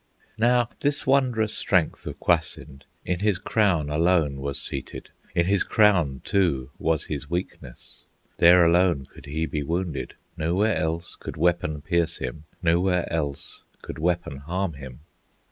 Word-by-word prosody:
Now 120 +1 +3
this 145 0 -1
wondrous 125 -5 +2
strength 90 -5 0
of - - -6
Kwasind 80 -5 -1 0.2
In 90 -1 -1
his 105 -2 +1
crown 90 -7 +1
alone 80 -3 +2
was 70 0 -2
seated; 70 -1 -4 0.2
In 85 - +3
his 100 0 +2
crown 90 - +3
too 70 -9 0
was 80 -2 0
his 75 -1 -5
weakness; 85 -7 -6 0.3
There 85 +1 +7
alone 85 -4 +3
could 70 - -15
he 80 +3 -2
be 75 -2 -3
wounded, 80 -2 -3 0.2
Nowhere 90 +7 +1
else 80 +2 -2
could - - -8
weapon 80 -3 0
pierce 85 0 +1
him, 65 +4 -6 0.2
Nowhere 90 +1 +1
else 70 -3 -4 0.2
could - - -7
weapon 85 -4 -1
harm 85 +5 -3
him. 70 -2 -10
85 Hz, 145 wpm, -25 LUFS, 75-95 Hz, 0.3 s, There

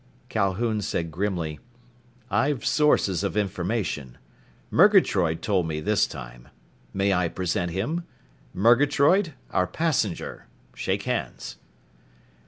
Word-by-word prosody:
Calhoun 105 +3 0
said 85 -3 -2
grimly, 85 -3 -2 0.7
"I've 130 +4 +1
sources 105 - +2
of 100 +1 -2
information. 95 - -2 0.5
Murgatroyd 100 - +4
told 95 -5 +1
me 75 -1 -3
this 105 +6 +2
time. - - -10 0.4
May 100 0 +1
I 90 -1 +2
present 90 +1 -2
him? 135 - -2 0.5
Murgatroyd, 145 - +3 0.2
our 90 - +1
passenger. 155 - -2 0.3
Shake - - -2
hands." - - -4
100 Hz, 100 wpm, -25 LUFS, 85-120 Hz, 0.7 s, Murgatroyd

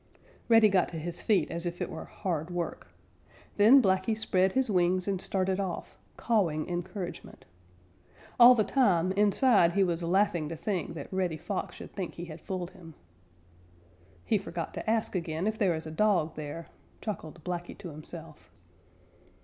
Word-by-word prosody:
Reddy 225 -2 +7
got 190 -4 +2
to 165 - -6
his 170 +2 -5
feet 190 -8 +2
as 170 +1 -3
if 175 0 -5
it - - -2
were - - -7
hard 170 -4 -3
work. 175 -1 -4 0.7
Then 240 +6 +7
Blacky 190 +3 +1
spread 190 -3 +1
his 265 -1 +2
wings 185 -2 +1
and 195 -2 -1
started 190 0 0
off, 190 -3 -4 0.2
cawing 175 -10 +1
encouragement. 175 +1 -6 0.9
All 245 +1 +10
the 220 - +3
time 190 -7 +2
inside 205 -2 +4
he 200 - +3
was 175 -2 -1
laughing 175 -3 +1
to 165 - -4
think 170 -1 -3
that 150 +4 -8
Reddy 180 -4 -1
Fox 195 +4 -4
should - - -10
think 190 -4 -5
he 175 - -6
had 160 -1 -10
fooled 185 -2 -4
him. 170 -5 -14 1.3
"He 215 -3 +2
forgot 170 -3 -5
to - - -4
ask 225 -1 0
again 165 -1 -2
if 220 +1 -1
there 185 -5 +2
is 160 0 -6
a 155 - -6
dog 175 -3 +2
there," 155 +2 -6 0.3
chuckled 170 -6 -6
Blacky 175 -1 -5
to 180 - -8
himself. 155 +1 -11
180 Hz, 165 wpm, -29 LUFS, 170-205 Hz, 1.3 s, All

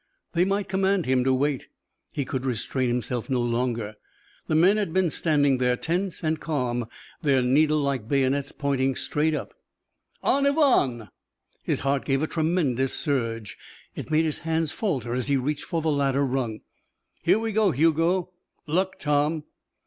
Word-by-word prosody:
They 175 +1 +3
might 195 +1 -1
command 190 -1 +1
him 130 -1 +2
to 135 - +3
wait 135 +1 0 0.4
he 140 - -3
could 130 0 -3
restrain 130 +1 -1
himself 120 0 -2
no 130 -2 +1
longer. 120 -3 -1 0.5
The 155 - +1
men 185 +6 +5
had 200 -6 -1
been 185 -3 +2
standing 145 -5 +2
there 125 -1 +2
tense 180 +5 -2
and 155 -1 0
calm, 125 -7 -2 0.3
their 135 -4 +3
needle 150 +5 +3
like 140 -6 -1
bayonets 135 +1 +1
pointing 135 -2 0
straight 155 +4 0
up. - - -5 0.7
"En 280 0 +3
avant!" 195 - +2 0.5
His - - -1
heart 140 0 0
gave 135 +1 0
a - - +3
tremendous 155 -6 0
surge. 115 - -2 0.3
It - - -7
made 160 +1 +3
his 155 - -2
hands 160 -1 -1
falter 140 - -2
as 125 +1 -1
he 140 -1 +2
reached 145 +3 -2
for 165 -3 -2
the 160 - +2
ladder 140 -1 +1
rung. 125 -5 -2 0.6
"Here 180 +4 +4
we 225 0 -2
go, 215 -1 +3
Hugo." 165 +4 +2 0.3
"Luck, 185 +4 0
Tom." 150 +1 0
145 Hz, 165 wpm, -25 LUFS, 130-165 Hz, 0.7 s, men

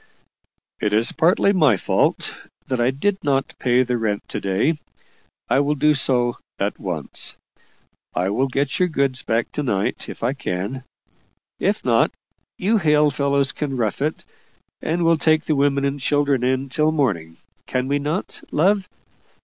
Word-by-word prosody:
"It 105 - 0
is 110 +2 +3
partly 175 +5 +3
my 150 - +4
fault, - - +1 0.3
that 130 -2 -1
I 120 - +3
did 190 +9 -1
not 135 -2 0
pay 125 0 +3
the 125 -1 -1
rent 105 -2 -2
to - - -4
day 105 +12 +1 0.7
I 135 - +3
will 145 +1 +1
do 150 +2 +3
so 125 -3 +2 0.2
at 100 +1 -2
once. 85 -7 -3 0.8
I 95 +2 0
will 130 +6 +1
get 135 +2 -1
your 180 - +4
goods 135 -5 0
back 115 +1 -1
to - - -3
night, 105 -9 -1
if - - -8
I 125 +3 +1
can. 120 +1 -4 0.7
If - - 0
not, - - +4 0.5
you 215 +4 +2
hale 150 -3 +3
fellows 140 0 +1
can 140 -5 -3
rough 110 0 -1
it, 155 +2 -2 0.6
and 170 +2 0
we'll 165 -1 +4
take 155 +1 +3
the 155 - +1
women 140 0 +2
and 140 +1 -1
children 140 -2 +1
in 130 +2 0
till 155 +4 +2
morning 95 - -1 0.3
can 125 0 -1
we 140 +1 +1
not, 150 +7 -3
love?" 190 +5 +2
140 Hz, 165 wpm, -22 LUFS, 120-150 Hz, 0.8 s, my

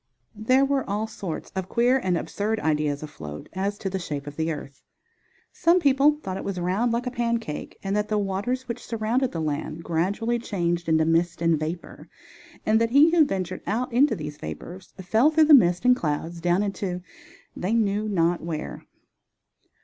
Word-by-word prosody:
There 255 +6 +3
were 275 -1 +1
all 210 +2 -1
sorts 190 -6 -6
of 190 -1 -3
queer 245 +3 +3
and 185 -7 0
absurd 215 +5 -2
ideas 150 -2 0
afloat 75 - -8
as 200 +2 -2
to 195 - -5
the 190 0 -2
shape 145 -5 -5
of 145 0 -8
the 160 +1 -1
earth. 140 -3 -8 0.7
Some 350 +1 +4
people 285 -1 +4
thought 190 0 -4
it - - -5
was 195 -2 -3
round 190 +7 0
like 235 +2 -1
a 250 - -2
pancake 235 -9 -3
and 195 +1 -1
that 210 0 0
the 215 - 0
waters 205 +6 -2
which 235 - -5
surrounded 235 +3 -1
the 165 - -4
land 155 +1 -3
gradually 200 +9 0
changed 175 -6 -2
into 160 0 +3
mist 170 +2 +1
and 165 -2 +2
vapor 160 +3 -6 0.6
and 220 +1 +3
that 230 - +2
he 285 +6 +6
who 335 -2 +6
ventured 185 -6 -3
out 235 +4 -1
into 260 0 +4
these 150 -4 -6
vapors 175 - -8
fell 220 +10 +3
through 315 0 +4
the 305 - +6
mist 180 -7 +5
and 250 0 +6
clouds 165 -3 -3
down 175 +3 +2
into 195 -3 -3 0.5
they 200 +6 -1
knew 215 -1 +1
not 175 -3 +1
where. 160 -2 -5
195 Hz, 185 wpm, -25 LUFS, 165-235 Hz, 0.7 s, he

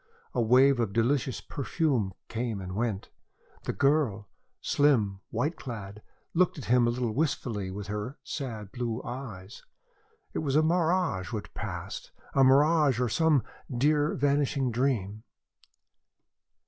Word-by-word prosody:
A 120 - +1
wave 130 +3 +5
of 110 -4 0
delicious 125 +3 +1
perfume 135 - -1
came 115 -2 -3
and 90 -1 -6
went. 110 -3 -2 0.5
The - - 0
girl 125 - +1 0.3
slim, 115 -10 +2
white 150 +9 -1
clad 105 -4 -7 0.3
looked 180 -1 +2
at 140 - -6
him 120 0 +4
a - - +3
little 120 -2 -1
wistfully 125 -9 -1
with 100 +2 -6
her 105 +7 -4
sad 110 -8 -5
blue 120 0 -3
eyes. 110 -6 -7 0.7
It - - -1
was 145 -3 -1
a 155 - +5
mirage 165 - +1
which 110 -3 -5
passed, - - -6 0.2
a 135 - +5
mirage 145 0 +5
or 125 -2 +1
some 155 0 +3 0.3
dear, 145 +4 +2
vanishing 140 -2 +1
dream. 110 -5 0
125 Hz, 135 wpm, -28 LUFS, 110-145 Hz, 0.7 s, wave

